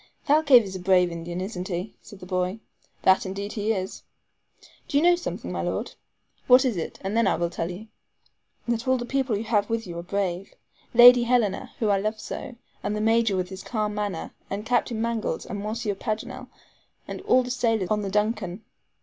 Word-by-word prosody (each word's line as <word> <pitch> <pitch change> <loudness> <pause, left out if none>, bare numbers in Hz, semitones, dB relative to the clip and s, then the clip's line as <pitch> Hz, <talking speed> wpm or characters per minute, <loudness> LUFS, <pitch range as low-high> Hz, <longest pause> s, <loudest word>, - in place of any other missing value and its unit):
"Thalcave 285 -5 +6
is 190 -2 -7
a - - -4
brave 180 -1 +3
Indian, 170 +1 -5
isn't 185 -2 -4
he?" 180 +2 -4
said 205 - -13
the - - -8
boy. 185 +2 -1 0.4
"That 190 0 +5
indeed 200 +2 -5
he 215 -1 -1
is." 190 -3 -3 0.9
"Do 285 - 0
you 295 - +3
know 350 0 +6
something, 345 - -5
my - - -2
Lord?" - - -3 0.5
"What 255 +1 +7
is 245 -5 +1
it, 170 - -4
and 195 +3 -2
then 230 -3 +3
I - - +3
will 170 +1 -1
tell 165 - -3
you?" 185 +5 -7 0.8
"That 235 +1 -1
all 260 0 +3
the 240 - -4
people 265 -4 0
you 210 - -3
have 210 -3 +1
with 225 0 -1
you 170 -2 -6
are - - -4
brave. 190 0 -3 0.4
Lady 245 +1 +10
Helena, 235 -5 0
whom 215 -3 +1
I 195 - +3
love 215 +2 -2
so, 250 - -7 0.3
and 205 +1 -2
the - - -2
Major, 225 -2 +2
with 180 -1 -2
his 190 0 -8
calm 215 -1 -2
manner, 205 -5 -3 0.2
and 200 +2 -4
Captain 240 -1 0
Mangles, 230 -1 -2
and 205 - -5
Monsieur 215 +1 -2
Paganel, 245 +6 -5 0.6
and - - -6
all 255 0 +3
the 250 - -5
sailors 225 -6 0
on 210 0 +2
the 200 - -3
DUNCAN. 210 -1 -1
210 Hz, 205 wpm, -25 LUFS, 190-235 Hz, 0.9 s, Lady